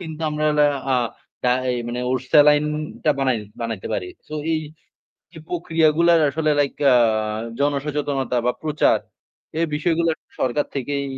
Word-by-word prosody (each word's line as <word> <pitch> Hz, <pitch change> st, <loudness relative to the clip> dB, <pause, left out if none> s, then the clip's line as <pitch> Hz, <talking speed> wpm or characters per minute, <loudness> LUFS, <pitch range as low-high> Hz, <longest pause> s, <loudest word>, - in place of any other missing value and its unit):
কিন্তু 160 Hz, -2 st, -7 dB
আমরা 150 Hz, 0 st, -2 dB, 0.5 s
আ -, -, +4 dB, 0.5 s
ডা 125 Hz, -, +2 dB, 0.2 s
এই 125 Hz, -, -1 dB
মানে 120 Hz, +1 st, -3 dB
ওরসালাইনটা 150 Hz, +3 st, +2 dB
বানাই 130 Hz, -3 st, +1 dB, 0.2 s
বানাইতে 115 Hz, -4 st, -4 dB
পারি। 90 Hz, -, -3 dB, 0.2 s
সো 155 Hz, -, -6 dB, 0.2 s
এই, 160 Hz, -, +1 dB, 0.7 s
এই 160 Hz, -, -10 dB
প্রক্রিয়াগুলার 165 Hz, -1 st, +3 dB
আসলে 155 Hz, +1 st, 0 dB
লাইক 140 Hz, -1 st, +1 dB
অ্যা 135 Hz, -, +7 dB, 0.7 s
জনসচেতনতা 140 Hz, -2 st, -1 dB
বা 125 Hz, -, +3 dB
প্রচার, 155 Hz, -1 st, +2 dB, 0.6 s
এই 165 Hz, -, +2 dB
বিষয়গুলো 165 Hz, +2 st, +1 dB, 0.3 s
সরকার 130 Hz, +3 st, 0 dB
থেকেই 140 Hz, +1 st, -2 dB
150 Hz, 130 wpm, -22 LUFS, 135-160 Hz, 0.7 s, অ্যা